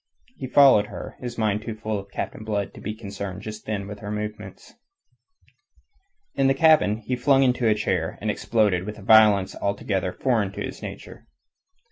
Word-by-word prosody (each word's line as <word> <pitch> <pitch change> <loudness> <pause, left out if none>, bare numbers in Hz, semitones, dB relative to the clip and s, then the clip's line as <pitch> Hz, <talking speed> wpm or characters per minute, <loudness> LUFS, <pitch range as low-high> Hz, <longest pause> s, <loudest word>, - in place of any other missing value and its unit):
He 130 - -6
followed 130 -6 +6
her, - - -8
his 120 -2 -6
mind 105 -2 0
too 110 0 -6
full 110 -1 -3
of 100 0 -11
Captain 105 - -5
Blood 105 -2 -3
to - - -12
be 105 +1 -5
concerned 100 -2 -7
just 110 0 -8
then 100 -2 -3
with 105 0 -8
her 105 - -7
movements. 105 -2 -7 1.6
In 135 - +2
the 135 - +3
cabin 155 -8 +4
he 130 - -1
flung 135 +2 +3
into 125 -2 +2
a 110 - +4
chair, 95 -6 -2
and 105 0 -1
exploded, 105 -6 +1
with 105 - -6
a 105 - -12
violence 105 -3 +5
altogether 100 -2 -2
foreign 110 -4 0
to - - -6
his - - -8
nature. - - -9
105 Hz, 180 wpm, -24 LUFS, 100-115 Hz, 1.6 s, followed